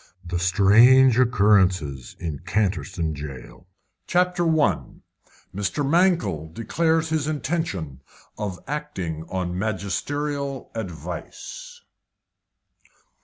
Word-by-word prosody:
THE 85 0 -2
STRANGE 115 +8 +6
OCCURRENCES 95 - +2
IN 80 -5 -4
CANTERSTONE 90 -4 -1
JAIL. 75 +4 -9 0.4
CHAPTER 180 0 +2
I. 145 - +2 0.7
MR. 105 +8 -1
MANKELL 170 - +2
DECLARES 160 - 0
HIS 155 -2 0
INTENTION 130 - -3 0.3
OF 100 -4 -4
ACTING 95 - -4
ON 90 -2 -2
MAGISTERIAL 135 - -3
ADVICE. 485 - -7
105 Hz, 80 wpm, -24 LUFS, 90-150 Hz, 0.7 s, STRANGE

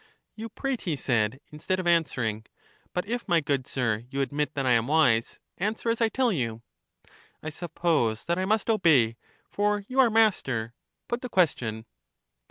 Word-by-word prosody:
You 225 +1 -7
prate, 270 +3 -3
he 170 -6 -2
said, 120 -3 0
instead 160 +5 -2
of 185 - -3
answering. 125 -11 0 0.4
But 180 - -2
if, 240 +3 -4
my 170 -3 +4
good 140 -3 -1
sir, 115 -4 -1
you 140 +1 -2
admit 145 +2 -2
that 135 -1 -1
I 130 - +3
am 115 0 +3
wise, 130 -7 +2 0.2
answer 215 +4 -1
as 230 - -2
I 225 - +4
tell 255 0 +1
you. 115 - -3 0.8
I 155 - -4
suppose 155 -9 -1
that 170 +1 0
I 185 - 0
must 215 +1 +1
obey, 145 - +4 0.4
for 205 0 0
you 260 +1 -2
are 255 -3 +6
master. 135 - +1 0.3
Put 240 +1 -2
the 250 - -5
question. 120 - 0
160 Hz, 175 wpm, -27 LUFS, -, 0.8 s, are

